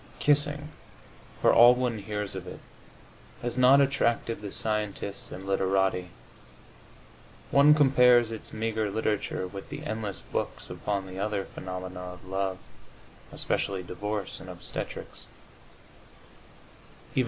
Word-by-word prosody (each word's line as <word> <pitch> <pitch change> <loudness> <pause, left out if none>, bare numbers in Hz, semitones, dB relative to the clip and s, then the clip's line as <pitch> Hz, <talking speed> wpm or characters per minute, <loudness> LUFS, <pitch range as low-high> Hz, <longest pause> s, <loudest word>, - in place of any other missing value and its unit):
Kissing, 145 0 +1 0.7
for - - +6
all 120 +1 +8
one 125 -3 -1
hears 105 0 -3
of 95 -1 -6
it, - - -8 0.8
has 120 0 -1
not 130 +2 +6
attracted 120 -5 +1
the 100 -2 -6
scientists 105 -2 -3
and 95 +1 -8
literati; 95 -1 +1 1.4
one 145 +2 +7
compares 125 -5 +5
its 110 - -6
meagre 110 -1 -1
literature 105 -2 -1
with 95 +1 -9
the 145 +1 -6
endless 110 -6 -4
books - - -4
upon 100 -2 -2
the 95 0 -8
other 100 -1 -1
phenomena 90 0 -7
of 90 0 -9
love, 95 0 -2 0.7
especially 95 -2 -1
divorce 100 +2 -4
and 95 - -10
obstetrics. 90 -1 -5
105 Hz, 115 wpm, -28 LUFS, 95-120 Hz, 1.4 s, all